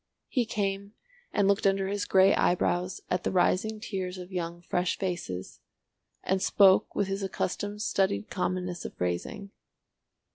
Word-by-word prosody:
He 245 -4 +1
came 200 -1 -2 0.4
and 200 -1 +2
looked 200 0 +3
under 195 0 +1
his 205 +1 -2
grey 190 +1 +5
eyebrows 180 +1 +1
at 180 0 0
the - - 0
rising 190 +4 +1
tiers 190 -4 -4
of 180 +1 -9
young 175 -1 -4
fresh 180 0 0
faces, 175 - -4 0.6
and 190 0 0
spoke 195 -1 +5
with 200 - +1
his 195 +1 -2
accustomed 205 +2 -3
studied 105 - 0
commonness 180 -1 -2
of - - -7
phrasing. 90 - -3
190 Hz, 145 wpm, -28 LUFS, 180-200 Hz, 0.6 s, grey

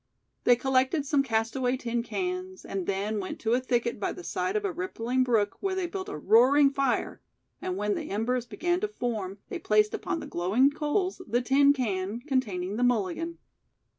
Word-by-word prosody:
They 245 - +7
collected 265 +4 +1
some 285 0 +3
castaway 245 +1 0
tin 235 -1 -2
cans 365 +6 -4
and 195 -2 -4
then 200 +2 -1
went 185 - -5
to 225 0 +1
a 245 - +4
thicket 240 -3 -1
by - - -1
the 360 - -10
side 380 - -2
of 425 -1 0
a 400 - 0
rippling 255 -8 -1
brook, 225 -5 +1
where 390 -1 -1
they 380 -1 -1
built 375 +3 -5
a 405 - -5
roaring 275 +5 +5
fire 275 -2 -1 0.4
and 370 0 -3
when 210 0 0
the - - -4
embers 240 +4 -1
began 350 +7 0
to 425 - -1
form 220 - -3
they - - -4
placed 210 0 +3
upon 370 -3 -2
the - - -7
glowing 210 +11 +2
coals 330 +6 -1
the 245 +1 +1
tin 280 +3 +5
can 210 -5 -1
containing 210 -9 -1
the 245 - +1
"mulligan". 245 - 0
255 Hz, 190 wpm, -28 LUFS, 220-330 Hz, 0.4 s, They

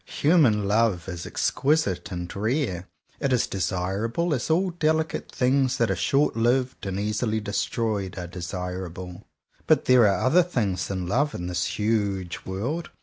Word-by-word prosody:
Human 135 - +4
love 105 -4 +1
is 85 -2 -5
exquisite 135 - 0
and 90 -1 -5
rare. 110 - -1 0.3
It 140 - 0
is 125 -2 +3
desirable, 100 - -1
as 130 +1 -2
all 180 +4 +2
delicate 160 -1 -1
things 130 0 +2
that 115 - +2
are - - +1
short 140 -2 +1
lived 125 0 0
and 95 0 -2
easily 110 +2 -1
destroyed 105 -1 -2
are 90 - -4
desir 90 +1 -5
able. 90 +2 -9 0.4
But - - +4
there 125 -4 +6
are 100 - +1
other 165 +8 +5
things 110 - -1
than 95 -2 -3
love 140 +11 0
in 85 - -5
this 90 0 -2
huge 100 -4 -1
world. 125 - -3
105 Hz, 155 wpm, -25 LUFS, 95-130 Hz, 0.4 s, there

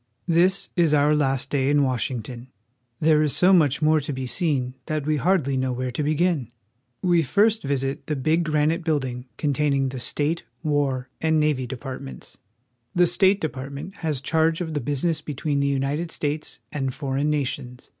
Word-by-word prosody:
THIS 180 +3 +3
is 165 -4 +3
our 145 +1 +4
last 135 -2 0
day 135 -1 +1
in 145 0 +4
Washington. 125 -1 -3 0.5
There 155 -1 +4
is 150 -2 +1
so 185 +2 +5
much 155 -4 +3
more 155 0 +4
to 145 0 -4
be 130 -1 -4
seen 130 -3 0
that 155 -2 -2
we 155 0 +1
hardly 150 -4 +1
know 130 0 0
where 125 0 -3
to 125 - -3
begin. 155 -3 +1 0.5
We 175 -2 +4
first 210 - +2
visit 135 -1 -2
the 150 - -1
big 155 +5 +1
granite 155 +2 +1
building 130 -6 -2
containing 140 -2 +1
the 130 0 -6
State, 150 +6 -1 0.2
War, 140 -4 0
and 160 -1 +2
Navy 150 -4 +1
departments. 130 - -8 0.6
The 175 0 +5
State 190 +3 +4
Department 140 +3 -6
has 155 -5 -2
charge 160 +3 +1
of 165 -3 -4
the 145 - -1
business 145 +5 -1
be 150 - -6
tween 145 +1 -1
the 140 - +1
United 140 +4 -1
States 150 -1 -3
and 135 -3 -2
foreign 140 0 -1
nations. 125 -4 -3
145 Hz, 175 wpm, -24 LUFS, 135-160 Hz, 0.6 s, so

